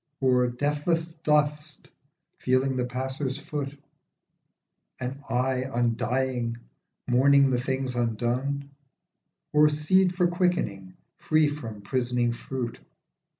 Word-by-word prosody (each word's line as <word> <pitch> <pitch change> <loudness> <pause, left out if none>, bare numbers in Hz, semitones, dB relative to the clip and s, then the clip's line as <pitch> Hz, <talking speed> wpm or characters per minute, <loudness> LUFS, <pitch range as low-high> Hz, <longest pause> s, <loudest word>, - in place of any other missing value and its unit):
Or 125 -2 +3
deathless 150 +6 -1
dust 150 -1 0 0.5
feeling 130 +1 +1
the 125 -1 0
passer's 130 +2 -3
foot? 145 -1 -5 1.2
An 130 +2 -4
eye 130 +2 +1
undying 120 0 0 0.5
mourning 135 +1 +5
things 130 0 -2
undone? 125 +5 -1 0.8
Or 150 0 +6
seed 175 +5 +3
for 180 -1 +3
quickening 175 - -1 0.2
free 155 -1 +3
from 115 -8 -6
prisoning 120 +1 0
fruit 120 -1 -5
130 Hz, 95 wpm, -27 LUFS, 125-150 Hz, 1.2 s, Or